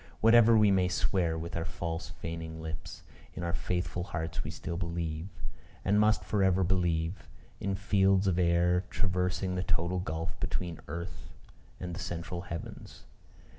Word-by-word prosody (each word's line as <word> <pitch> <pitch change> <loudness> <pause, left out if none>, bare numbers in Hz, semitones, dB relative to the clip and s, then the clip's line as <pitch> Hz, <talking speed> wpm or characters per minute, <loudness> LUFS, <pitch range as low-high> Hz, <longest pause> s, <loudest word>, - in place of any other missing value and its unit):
Whatever 115 0 +7
we 105 -2 +6
may 95 -2 +4
swear 90 -2 +1
with 85 +1 -5
our 85 - -1
false 85 -2 -4
feigning 80 -1 -6
lips, 80 -1 -6 0.3
in 85 - -4
our 85 -1 -1
faithful 90 -1 -1
hearts 80 -3 -3
we 75 - -5
still 85 +2 -5
believe, 85 -1 -3 0.6
and 100 +2 +4
must 105 0 +4
for 105 -2 +1
ever 95 0 +4
believe, 85 -1 0 0.3
in 100 0 -1
fields 95 0 +3
of 90 -2 +2
air 90 +1 +3
traversing 90 0 0
the 90 - 0
total 85 0 0
gulf 80 -2 -3
between 85 -3 -3
earth 85 +4 -6 0.5
and 90 -1 -4
the 85 - -5
central 85 0 -4
heavens. 85 -2 -7
90 Hz, 155 wpm, -31 LUFS, 85-95 Hz, 0.6 s, Whatever